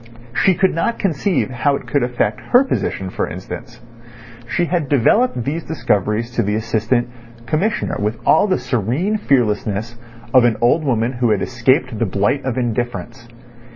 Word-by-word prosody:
She 190 +6 +3
could 190 +2 +2
not 200 +8 -1
conceive 175 -4 0
how 140 +3 +1
it - - -6
could 145 - 0
affect 125 0 -1
her 250 +2 +4
position, 95 - -2
for - - -2
instance. 120 +8 -8 0.7
She 175 -1 +1
had 170 -5 -1
developed 145 - +2
these 155 +6 -3
discoveries 105 - -1
to 120 - 0
the 105 -1 0
Assistant 115 +2 0 0.4
Commissioner 180 - -1
with 105 +2 -1
all 180 - +4
the 185 - +2
serene 130 - -1
fearlessness 115 - 0 0.3
of 130 -2 +7
an 120 -2 +2
old 125 +8 +3
woman 120 -4 0
who 120 -1 0
had 105 -3 +1
escaped 125 -1 +1
the 115 - +1
blight 100 +9 0
of 130 -2 -2
indifference. 120 -1 -3
125 Hz, 160 wpm, -19 LUFS, 110-155 Hz, 0.7 s, of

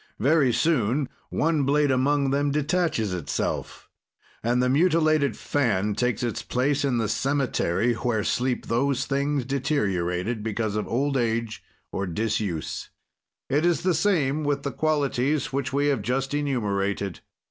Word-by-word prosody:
"Very 140 +1 +3
soon, 130 0 +1 0.2
one 160 -1 +1
blade 145 +1 +2
among 135 +1 +2
them 145 +1 +1
detaches 150 - 0
itself, 85 -5 -3 0.6
and 120 +2 +2
the 125 - +2
mutilated 155 - +3
fan 105 -7 0
takes 125 +1 -1
its 120 -3 -2
place 140 +3 0
in 135 -4 +1
the 115 -2 0
cemetery 120 -4 0
where 115 -2 -1
sleep 125 +3 -1
those 135 +3 0
things 140 -1 0
deteriorated 110 - -1
because 110 -1 -2
of 105 - -2
old 135 +3 0
age 115 -2 -1 0.3
or 100 - -2
disuse. 105 -3 -2 0.6
"It 145 +3 +1
is 175 0 +2
the 185 -1 +2
same 155 -4 +1
with 145 -1 -1
the 140 - -2
qualities 145 -2 0
which 135 -1 -1
we 140 +2 +1
have 135 -6 +1
just 135 +5 -1
enumerated. 100 - -1
130 Hz, 140 wpm, -25 LUFS, 110-145 Hz, 0.6 s, Very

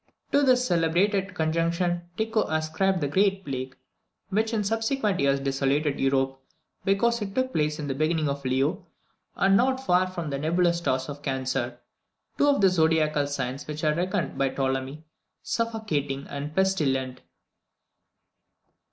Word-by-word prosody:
To 285 - +4
this 255 -2 +4
celebrated 185 +2 +1
conjunction 170 +2 0
Tycho 220 0 +1
ascribed 160 +4 0
the 145 - +1
great 195 +5 +1
plague 130 -1 -4 0.5
which 220 +3 0
in 220 -2 0
subsequent 225 -1 0
years 140 0 +2
desolated 135 +2 0
Europe, 135 0 +1 0.4
because 230 +4 +2
it 195 -1 -5
took 260 0 0
place 150 -1 0
in 150 - -4
the 140 - -2
beginning 155 +2 0
of 140 0 -3
Leo, 140 +9 0 0.5
and 195 0 +3
not 260 +4 +3
far 180 -2 +3
from 170 -5 -5
the 140 - -2
nebulous 170 +3 +2
stars 130 -6 -1
of 145 -1 -7
Cancer, 130 -3 -2 0.6
two 290 - +4
of 285 -6 +3
the 195 - +6
zodiacal 160 -4 +2
signs 135 -1 -4
which 150 +1 -5
are 155 -1 +3
reckoned 180 -2 -2
by 135 0 +2
Ptolemy 135 +2 -2 0.4
"suffocating 215 -12 -2
and 145 +2 -5
pestilent!" 135 -10 0
160 Hz, 145 wpm, -26 LUFS, 140-195 Hz, 0.6 s, the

